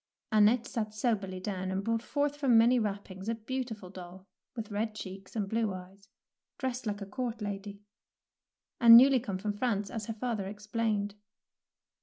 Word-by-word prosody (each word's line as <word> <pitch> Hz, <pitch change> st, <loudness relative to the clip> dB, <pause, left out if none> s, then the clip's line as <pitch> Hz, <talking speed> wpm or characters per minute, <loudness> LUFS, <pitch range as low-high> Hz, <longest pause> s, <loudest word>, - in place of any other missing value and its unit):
'' -, -, -58 dB
Annette 220 Hz, +3 st, +5 dB
sat 215 Hz, -4 st, -4 dB
soberly 205 Hz, -5 st, -1 dB
down 185 Hz, -1 st, -3 dB
and 190 Hz, +1 st, -2 dB
brought 230 Hz, +1 st, 0 dB
forth 290 Hz, +3 st, -1 dB
from 270 Hz, -5 st, +4 dB
many 240 Hz, +2 st, +5 dB
wrappings 200 Hz, -2 st, -4 dB
a 230 Hz, -, 0 dB
beautiful 225 Hz, -4 st, -5 dB
doll, 185 Hz, 0 st, -10 dB, 0.3 s
with 225 Hz, -3 st, -6 dB
red 215 Hz, +1 st, -2 dB
cheeks 195 Hz, 0 st, -9 dB
and 205 Hz, -3 st, -1 dB
blue 220 Hz, 0 st, 0 dB
eyes, 190 Hz, +2 st, -10 dB, 0.5 s
dressed 255 Hz, -2 st, -3 dB
like 205 Hz, 0 st, -3 dB
a -, -, -4 dB
court 235 Hz, +3 st, -4 dB
lady, 200 Hz, 0 st, -6 dB, 1.0 s
and 230 Hz, -1 st, +11 dB
newly 265 Hz, +1 st, +7 dB
come 205 Hz, -6 st, -4 dB
from 205 Hz, +2 st, -2 dB
France, 205 Hz, -2 st, -1 dB
as 220 Hz, -2 st, -5 dB
her 225 Hz, -, -2 dB
father 220 Hz, -3 st, -3 dB
explained. 210 Hz, 0 st, -2 dB
215 Hz, 170 wpm, -31 LUFS, 195-230 Hz, 1.0 s, and